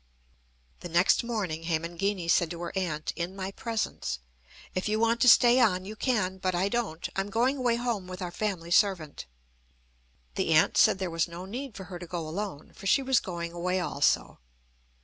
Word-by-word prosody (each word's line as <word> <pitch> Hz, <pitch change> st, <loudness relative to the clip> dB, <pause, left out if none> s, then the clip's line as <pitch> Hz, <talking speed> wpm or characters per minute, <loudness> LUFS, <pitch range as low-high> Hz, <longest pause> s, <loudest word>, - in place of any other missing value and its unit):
The 175 Hz, -, -7 dB
next 175 Hz, +8 st, +3 dB
morning 190 Hz, -9 st, -3 dB
Hemangini 170 Hz, +3 st, -1 dB
said 170 Hz, 0 st, +3 dB
to 170 Hz, 0 st, -6 dB
her 175 Hz, -, -5 dB
aunt 160 Hz, -5 st, -2 dB
in 175 Hz, +2 st, -4 dB
my 190 Hz, 0 st, -4 dB
presence: 225 Hz, -, -3 dB, 0.6 s
"If 185 Hz, +3 st, -2 dB
you 215 Hz, +1 st, +1 dB
want 230 Hz, +1 st, +2 dB
to 250 Hz, -, +7 dB
stay 240 Hz, +2 st, +7 dB
on, 185 Hz, -6 st, +3 dB
you 215 Hz, +2 st, -7 dB
can. 210 Hz, -6 st, 0 dB
But 185 Hz, -1 st, -1 dB
I 185 Hz, +3 st, +1 dB
don't. 205 Hz, -8 st, -2 dB
I'm 195 Hz, +1 st, -1 dB
going 245 Hz, +7 st, +1 dB
away 245 Hz, -3 st, +1 dB
home 235 Hz, -6 st, -2 dB
with 185 Hz, 0 st, -7 dB
our 180 Hz, -2 st, -4 dB
family 180 Hz, -4 st, -3 dB
servant." 175 Hz, -, +1 dB, 1.1 s
The -, -, 0 dB
aunt -, -, +4 dB
said -, -, +5 dB
there 190 Hz, -2 st, -3 dB
was 165 Hz, +1 st, 0 dB
no 170 Hz, +2 st, -8 dB
need 240 Hz, +2 st, -6 dB
for 190 Hz, -, -7 dB
her 180 Hz, -1 st, -8 dB
to 175 Hz, -, -8 dB
go 165 Hz, -2 st, -4 dB
alone, 180 Hz, -2 st, -5 dB
for 195 Hz, -, -7 dB
she 275 Hz, -, +4 dB
was 260 Hz, -2 st, +3 dB
going 170 Hz, -2 st, -5 dB
away 180 Hz, +2 st, -1 dB
also. 145 Hz, -5 st, 0 dB
185 Hz, 190 wpm, -28 LUFS, 170-215 Hz, 1.1 s, to